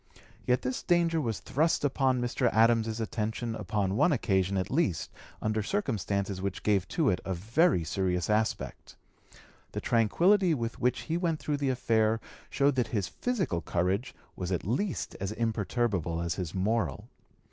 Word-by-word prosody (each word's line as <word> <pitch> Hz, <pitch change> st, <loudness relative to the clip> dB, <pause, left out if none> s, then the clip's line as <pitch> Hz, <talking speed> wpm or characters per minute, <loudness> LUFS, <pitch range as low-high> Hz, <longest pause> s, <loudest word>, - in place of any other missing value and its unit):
Yet 125 Hz, 0 st, +2 dB
this 125 Hz, 0 st, -2 dB
danger 170 Hz, -2 st, +2 dB
was 115 Hz, -6 st, -2 dB
thrust 155 Hz, +1 st, +1 dB
upon 130 Hz, -2 st, +2 dB
Mr. 120 Hz, 0 st, +1 dB
Adams's 115 Hz, 0 st, +3 dB
attention 110 Hz, +1 st, -2 dB
upon 100 Hz, -2 st, -1 dB
one 170 Hz, -, +4 dB
occasion 100 Hz, -, +1 dB
at 95 Hz, 0 st, -2 dB
least 130 Hz, -, 0 dB, 0.3 s
under 110 Hz, 0 st, 0 dB
circumstances 100 Hz, -, -1 dB
which 100 Hz, -1 st, -3 dB
gave 100 Hz, -4 st, +2 dB
to 160 Hz, -5 st, +1 dB
it 90 Hz, -, -1 dB
a 95 Hz, -, -2 dB
very 115 Hz, -, +2 dB
serious 90 Hz, +1 st, -1 dB
aspect. 110 Hz, +1 st, -1 dB, 0.8 s
The -, -, -2 dB
tranquillity 170 Hz, -, +3 dB
with 115 Hz, -3 st, -4 dB
which 125 Hz, +1 st, +1 dB
he 165 Hz, +1 st, -2 dB
went 170 Hz, -3 st, 0 dB
through 150 Hz, -1 st, -1 dB
the 140 Hz, -1 st, 0 dB
affair 115 Hz, -3 st, +2 dB, 0.3 s
showed 140 Hz, +1 st, +2 dB
that 125 Hz, -, +2 dB
his 100 Hz, -5 st, -1 dB
physical 185 Hz, -, -1 dB
courage 95 Hz, +9 st, -1 dB, 0.2 s
was 90 Hz, 0 st, -4 dB
as 105 Hz, -, -2 dB
imperturbable 110 Hz, -6 st, -1 dB
as 85 Hz, -1 st, -1 dB
his 90 Hz, -2 st, -5 dB
moral. 110 Hz, +2 st, -1 dB
115 Hz, 150 wpm, -29 LUFS, 95-135 Hz, 0.8 s, one